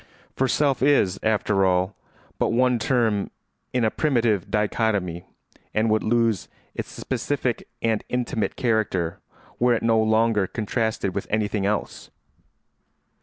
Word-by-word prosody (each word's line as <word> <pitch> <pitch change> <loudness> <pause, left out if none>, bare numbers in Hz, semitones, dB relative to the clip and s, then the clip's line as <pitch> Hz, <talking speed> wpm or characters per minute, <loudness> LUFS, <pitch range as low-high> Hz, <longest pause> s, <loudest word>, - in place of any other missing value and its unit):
For 130 - +1
self 140 0 +1
is, 130 -9 +3
after 105 -2 +1
all, 95 +1 +1 0.4
but - - +2
one 125 +1 +2
term 110 -4 +1 0.4
in 125 -2 +1
a 110 - +2
primitive 115 - +1
dichotomy 105 -5 0 0.5
and 110 +1 +2
would 110 - +3
lose 115 -3 +1 0.2
its - - -5
specific - - -2 0.2
and 110 -2 +1
intimate 120 -3 -1
character 110 -9 0 0.4
were 120 0 +4
it 115 - -3
no 115 -1 +3
longer 110 -2 +2
contrasted 110 -3 -2
with 100 - -4
anything 105 -2 0
else. 105 0 -3
110 Hz, 125 wpm, -24 LUFS, 100-120 Hz, 0.5 s, were